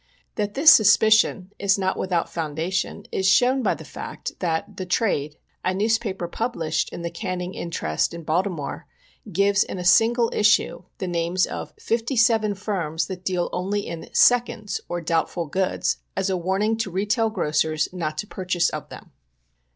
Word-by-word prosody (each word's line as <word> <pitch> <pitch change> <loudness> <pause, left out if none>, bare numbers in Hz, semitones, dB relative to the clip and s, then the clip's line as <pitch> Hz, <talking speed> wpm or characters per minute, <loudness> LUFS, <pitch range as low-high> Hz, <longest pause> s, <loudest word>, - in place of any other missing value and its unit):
That 205 -1 -3
this 310 +4 +8
suspicion 210 -2 +4
is 200 0 +2
not 190 -1 0
without 180 -3 -1
foundation 165 +3 -3
is 190 - 0
shown 250 +6 +4
by - - +1
the - - -11
fact - - -7
that 165 -3 -2
The 185 - -4
Trade, 155 -7 0 0.3
a 185 0 0
newspaper 210 -3 0
published 170 -6 -2
in 170 - -7
the 170 - -3
canning 185 -2 -4
interest 80 - -2
in 170 0 -8
Baltimore, 170 -1 -2 0.4
gives, 200 +2 +3
in - - -7
a 180 - -5
single 230 +5 +4
issue, 215 +1 +3 0.2
the 185 - -4
names 175 +1 +1
of - - -7
fifty 235 +4 -1
seven 220 -2 +3
firms 185 -6 -2
that 185 -1 -7
deal 180 -2 0
only 200 +3 -2
in 165 -1 -7
" - - -31
seconds," 235 -3 +1
or 175 0 -3
doubtful 165 +1 -1
goods, 185 +5 -1 0.2
as 195 0 0
a - - +1
warning 190 +5 0
to 220 -3 -2
retail 210 +5 0
grocers 155 -5 0
not 155 -4 -3
to 185 - -3
purchase 180 -3 0
of - - -6
them. - - -12
190 Hz, 165 wpm, -23 LUFS, 170-215 Hz, 0.4 s, this